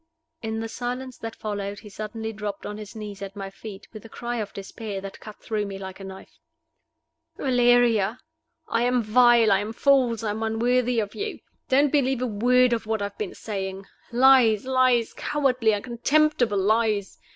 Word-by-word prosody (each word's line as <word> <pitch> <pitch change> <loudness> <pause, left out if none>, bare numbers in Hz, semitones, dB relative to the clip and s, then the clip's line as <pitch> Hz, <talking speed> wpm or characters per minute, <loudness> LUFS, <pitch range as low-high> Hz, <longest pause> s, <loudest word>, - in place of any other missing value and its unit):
In 220 0 -3
the 225 - -3
silence 250 +2 -5
that 225 0 -6
followed 205 -1 -4
he 210 - -12
suddenly 220 +2 -5
dropped 205 -1 -5
on 210 +1 -6
his 210 0 -9
knees 205 -2 -7
at 195 0 -7
my 195 -1 -6
feet, 200 0 -10
with 215 - -10
a 225 - -12
cry 240 +1 -4
of 210 -3 -4
despair 200 +1 -6
that 195 0 -9
cut 215 -1 -11
through 210 -2 -2
me 195 -1 -6
like 190 0 -8
a - - -9
knife. 190 0 -11 1.0
"Valeria! 245 -4 +3 0.5
I 230 - 0
am 245 0 +2
vile 235 0 +5
I 195 - +4
am 210 +2 -4
false 250 -3 +2
I 215 - 0
am 215 +2 -4
unworthy 240 +2 +1
of 205 -2 -3
you. 415 +1 -4 0.3
Don't 280 +2 +4
believe 265 -3 +1
a - - +1
word 245 +3 +3
of 230 -2 -2
what 220 -2 -1
I - - 0
have 200 - -8
been 205 -4 -4
saying 195 -2 -5 0.3
lies, 245 -3 +5
lies, 255 -3 +2
cowardly, 250 -7 +1
contemptible 250 -2 +2
lies! 210 0 +1
225 Hz, 185 wpm, -25 LUFS, 205-245 Hz, 1.0 s, vile